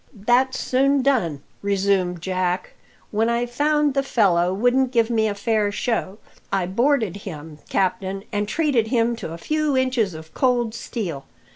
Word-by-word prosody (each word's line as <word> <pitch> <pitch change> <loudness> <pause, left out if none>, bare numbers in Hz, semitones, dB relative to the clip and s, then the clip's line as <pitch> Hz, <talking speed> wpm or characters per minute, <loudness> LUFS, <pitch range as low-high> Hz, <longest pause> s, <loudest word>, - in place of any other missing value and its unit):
"That's 245 +5 +2
soon 275 +1 +2
done," 175 - +1 0.2
resumed 195 -3 0
Jack. 185 -1 -1 0.4
"When 220 +2 +1
I 235 +1 +1
found 295 +4 +1
the 275 - +2
fellow 185 -9 +2
wouldn't 245 +6 +2
give 230 -2 +2
me 220 -1 +2
a 205 - -2
fair 210 0 0
show, 210 -3 -2 0.3
I 190 -2 +1
boarded 225 - +1
him, 160 -6 -9
captain, 190 +1 -1
and 205 -1 -1
treated 265 -3 +1
him 235 0 +1
to 160 - -6
a 165 - -6
few 305 - 0
inches 250 -8 +1
of 160 0 -11
cold 245 -4 +1
steel. 175 - -5
220 Hz, 155 wpm, -22 LUFS, 190-255 Hz, 0.4 s, That's